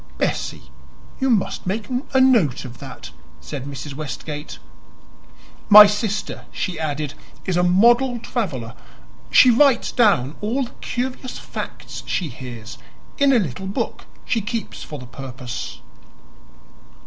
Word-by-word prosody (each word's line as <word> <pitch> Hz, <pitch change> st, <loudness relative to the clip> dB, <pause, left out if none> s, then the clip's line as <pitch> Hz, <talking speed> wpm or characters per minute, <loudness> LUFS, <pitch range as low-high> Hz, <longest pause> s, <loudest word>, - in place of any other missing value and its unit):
"Bessie, -, -, -2 dB, 0.5 s
you 265 Hz, -, +1 dB
must 210 Hz, -5 st, 0 dB
make 205 Hz, +3 st, -2 dB, 0.3 s
a -, -, +6 dB
note 230 Hz, -, +4 dB
of 120 Hz, -1 st, -10 dB
that," -, -, -9 dB, 0.3 s
said 140 Hz, -3 st, -6 dB
Mrs. 140 Hz, 0 st, -6 dB
Westgate. 150 Hz, +1 st, -6 dB, 1.1 s
"My 210 Hz, 0 st, +12 dB
sister," 210 Hz, 0 st, -2 dB
she 185 Hz, -4 st, -3 dB
added, 150 Hz, -2 st, -2 dB, 0.3 s
"is 185 Hz, -, 0 dB
a 175 Hz, -, +3 dB
model 240 Hz, +8 st, +4 dB
traveler. 155 Hz, -, -3 dB, 0.6 s
She 255 Hz, -, +7 dB
writes 260 Hz, 0 st, +4 dB
down 175 Hz, -, +3 dB
all 235 Hz, +6 st, 0 dB
the 245 Hz, -, -7 dB
curious 255 Hz, +1 st, -4 dB
facts -, -, -7 dB
she 175 Hz, -5 st, -1 dB
hears 120 Hz, -3 st, -9 dB, 0.4 s
in 280 Hz, -1 st, +5 dB
a 260 Hz, -, +5 dB
little 190 Hz, -, -2 dB
book 195 Hz, -, -3 dB, 0.2 s
she 225 Hz, -, 0 dB
keeps 225 Hz, +2 st, -4 dB
for 150 Hz, -, -7 dB
the 125 Hz, -, -9 dB
purpose." 130 Hz, -1 st, -7 dB
190 Hz, 130 wpm, -22 LUFS, 140-235 Hz, 1.1 s, My